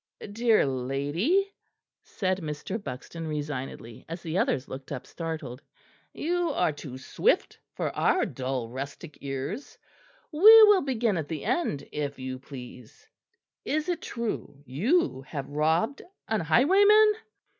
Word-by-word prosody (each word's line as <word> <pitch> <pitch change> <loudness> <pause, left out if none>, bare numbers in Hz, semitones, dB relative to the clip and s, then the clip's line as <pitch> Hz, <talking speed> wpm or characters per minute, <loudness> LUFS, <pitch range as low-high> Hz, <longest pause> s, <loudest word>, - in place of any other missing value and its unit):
"Dear 225 -2 +3
lady," 145 - 0 0.5
said 185 -1 -2
Mr. 160 +7 -5
Buxton 155 +5 -6
resignedly, 145 -6 -5
as 165 +1 -6
the 160 0 -4
others 130 - 0
looked 135 0 -9
up 135 -3 -5
startled, 160 -6 -6 0.5
"you 350 +1 -1
are 175 -9 +2
too 140 -3 -8
swift 130 - 0 0.2
for - - -3
our - - +2
dull 130 -2 -3
rustic 140 +5 -8
ears; 140 - -5 0.5
we 300 - -6 0.2
will 415 -3 +7
begin 235 -7 0
at 155 -3 -3
the 155 -3 -5
end, 235 - -1
if 145 -1 -3
you 130 0 -5
please. 130 - -12 0.6
Is 310 +3 -1
it 340 -2 -1
true 215 -11 -5
you 175 - +1
have 140 -3 -5
robbed 160 - 0 0.3
an 220 -1 0
highwayman?" 400 - +5
160 Hz, 130 wpm, -27 LUFS, -, 0.6 s, will